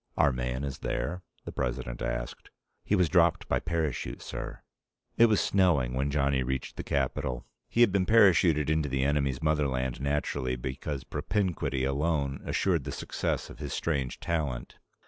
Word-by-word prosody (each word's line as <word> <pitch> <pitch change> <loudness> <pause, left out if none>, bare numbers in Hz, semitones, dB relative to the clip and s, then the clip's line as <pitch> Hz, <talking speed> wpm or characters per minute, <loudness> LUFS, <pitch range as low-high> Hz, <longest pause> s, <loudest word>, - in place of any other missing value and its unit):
"Our 70 - +5
man 65 +1 -2
is 70 -2 -4
there?" 90 +5 -2 0.2
the - - -5
President - - -3
asked. 65 -1 -4 0.3
"He 105 - +1
was 90 -3 +3
dropped 85 -1 +3
by - - +1
parachute, 80 -5 -2
sir!" - - -6 0.5
It 115 - +7
was 105 -3 +3
snowing 85 -11 +2
when 65 +2 0
Johnny 70 -2 +1
reached 65 +1 -3
the - - -4
capital. 65 -2 -1 0.2
He 120 - +1
had 120 -4 +6
been 95 -2 +1
parachuted 90 -8 +5
into 80 -1 +1
the 65 0 0
enemy's 70 -1 0
motherland, 70 -5 0
naturally, 70 -2 -1
because 65 +3 -4
propinquity 90 -9 -1
alone 70 0 0
assured 85 -7 +1
the - - -5
success - - -3
of - - -13
his - - -4
strange 70 -6 -1
talent. 75 -8 -3
70 Hz, 160 wpm, -29 LUFS, 65-85 Hz, 0.5 s, It